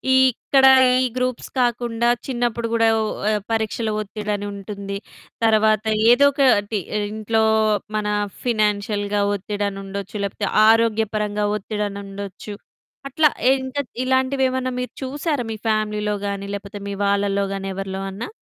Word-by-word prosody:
ఇక్కడ 260 +1 +4 0.4
ఈ - - +2
గ్రూప్స్ 255 -1 -2
కాకుండా 240 -1 +1 0.2
చిన్నప్పుడు 240 -2 -1
కూడా 225 0 +3
ఓ - - +1 0.5
పరీక్షల 220 0 -1
ఒత్తిడని 210 0 -4
ఉంటుంది, 200 0 -6 0.5
తర్వాత 215 -1 +3 0.3
ఏదో 280 +4 +6
ఒకటి 225 -7 +2 0.3
ఇంట్లో 220 +1 0 0.5
మన 210 -1 -1 0.4
ఫినాన్షియల్‌గా 210 -2 0
ఒత్తిడని 205 0 -3
ఉండొచ్చు, 200 +1 -7
లేకపోతే 200 +1 -2 0.2
ఆరోగ్యపరంగా 215 -2 +1
ఒత్తిడని 210 -1 -3
ఉండొచ్చు. 200 +1 -8 0.6
అట్లా 300 +2 +4 0.3
ఇంకా 260 +2 -2 0.2
ఇలాంటివేమన్నా 260 0 +1
మీరు 250 - -4
చూసారా 280 -1 -2
మీ 220 - -4
ఫ్యామిలీలో 210 -1 0
గాని, 200 0 -4
లేకపోతే 200 0 -8
మీ 200 - -4
వాళ్ళలో 200 0 +1
గాని 195 0 -4
ఎవరిలో 195 0 -4
అన్నా? 200 +4 -6
215 Hz, 115 wpm, -21 LUFS, 200-240 Hz, 0.6 s, ఏదో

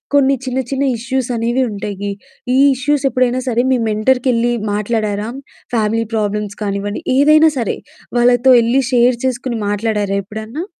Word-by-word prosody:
కొన్ని 275 -1 +4
చిన్న 255 +1 -1
చిన్న 275 0 0
ఇష్యూస్ 250 +2 -2
అనేవి 240 +3 0
ఉంటాయి. 200 0 -4 0.4
ఈ - - +4 0.2
ఇష్యూస్ 285 +2 0
ఎప్పుడైనా 255 0 +1
సరే, 240 0 +1
మీ 255 - +2
మెంటర్‌కెళ్ళి 240 +2 +1 0.2
మాట్లాడారా? 210 0 -2 0.5
ఫ్యామిలీ 225 +1 0
ప్రాబ్లమ్స్ 210 -1 -2
కానివ్వండి, 205 0 -3 0.2
ఏదైనా 305 +3 +5
సరే 230 - -2 0.4
వాళ్ళతో 245 +1 +4
ఎళ్ళి 245 +4 +2
షేర్ 245 0 +4
చేసుకొని 255 -1 -2
మాట్లాడారా 205 -1 -1
ఎప్పుడన్నా? 220 - -6
235 Hz, 135 wpm, -17 LUFS, 210-260 Hz, 0.5 s, ఏదైనా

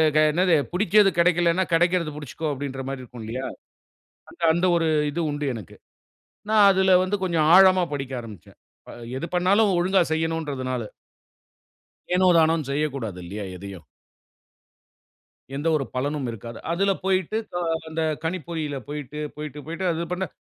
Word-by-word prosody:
க - - +6
என்னது? 180 +2 +2 0.2
புடிச்சது 205 +2 +4
கெடைக்கலன்னா, 175 +1 +3
கெடைக்கறது 170 -1 +2
புடிச்சுக்கோ 150 +2 -5
அப்டின்ற 135 -1 -5
மாரி 135 -1 -4
இருக்குன்லயா! 120 +1 -6 0.8
அந்த - - -18
அந்த 175 +2 +1
ஒரு 165 -1 +1 0.2
இது 170 +4 -2
உண்டு 145 0 -3
எனக்கு. 110 -7 -9 0.8
நான் 210 -2 +6
அதுல 190 -1 +4
வந்து 185 +2 0
கொஞ்சம் 165 -4 +1
ஆழமா 185 -1 +7
படிக்க 135 -2 -4
ஆரம்பிச்சேன். 110 -7 -12 0.3
அ - - -9 0.2
எது 135 - -3
பண்ணாலும், 195 +4 +3
ஒழுங்கா 185 +1 +3
செய்யணுன்றதனால. 150 -6 -2 1.3
ஏனோ 185 0 +4
தானோன்னு 160 -3 +2
செய்யக்கூடாதில்லியா 110 - -3
எதையும். 95 -2 -10 1.7
எந்த 145 - -4
ஒரு 140 - -1
பலனும் 140 +1 -2
இருக்காது. 115 +1 -8
அதில 195 +3 +1
போய்ட்டு 190 +2 0
க 175 - -5 0.3
அந்த 160 +1 -2 0.2
கணிப்பொறியில 160 -4 -3
போய்ட்டு, 150 0 -6 0.2
போய்ட்டு, 150 -1 -7
போய்ட்டு 170 +3 -3
அது 170 +1 -4
பண்ண 185 +1 -2
160 Hz, 130 wpm, -24 LUFS, 135-180 Hz, 1.7 s, ஆழமா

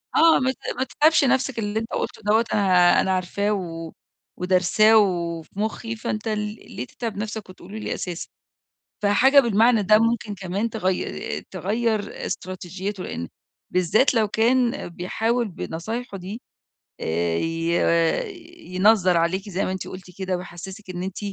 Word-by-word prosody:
آه، 325 0 +6
ما 260 0 +1
ت - - -10 0.2
ما 260 - +1
تتعبش 305 +3 +3
نَفْسك، 265 -2 +1
اللي 210 0 -1
أنت 225 - -6
قُلت - - -3
له - - -18
دوّة 220 +3 +3
أنا 210 - +2
ها 180 -2 +5
أنا 190 - 0
عارفاه 190 +3 0
و 165 -4 -5 0.5
ودارساه 185 +4 +4
و 175 -5 +1
وفي 160 - -14
مُخّي، 220 +2 -3
فأنت 215 0 -4
ل 215 -1 0 0.4
ليه 125 - -4
تتعب 225 - -6
نَفْسك 215 -1 -5
وتقوله 185 +3 -10
لي 215 - -3
أساسًا؟ 175 -2 -5 0.8
فحاجة 260 +8 +6
بالمعنى 230 -2 +4
ده 215 +2 +6
ممكن 230 -2 0
كمان 195 +4 -2
تغي 190 -5 -2
تغيّر 210 +3 -2
استراتيجيته، 185 +1 -5
لإن 85 - -5 0.5
بالذات 185 +10 +3
لو 225 -3 +3
كان 240 +4 +1
بيحاول 225 +7 -1
بنصايحه 205 +6 -5
دي 195 +6 -7 0.6
آآ 85 +1 0
ي 165 - -1 1.0
ينظّر 185 -2 +4
عليكِ 185 +4 0
زي 190 0 -1
ما - - -2
أنتِ 190 - -5
قُلتِ 185 0 -9
كده 190 -1 -1
ويحسّسِك 185 +3 -9
إن 180 0 -4
أنتِ 190 0 -5
200 Hz, 155 wpm, -23 LUFS, 180-225 Hz, 1.0 s, آه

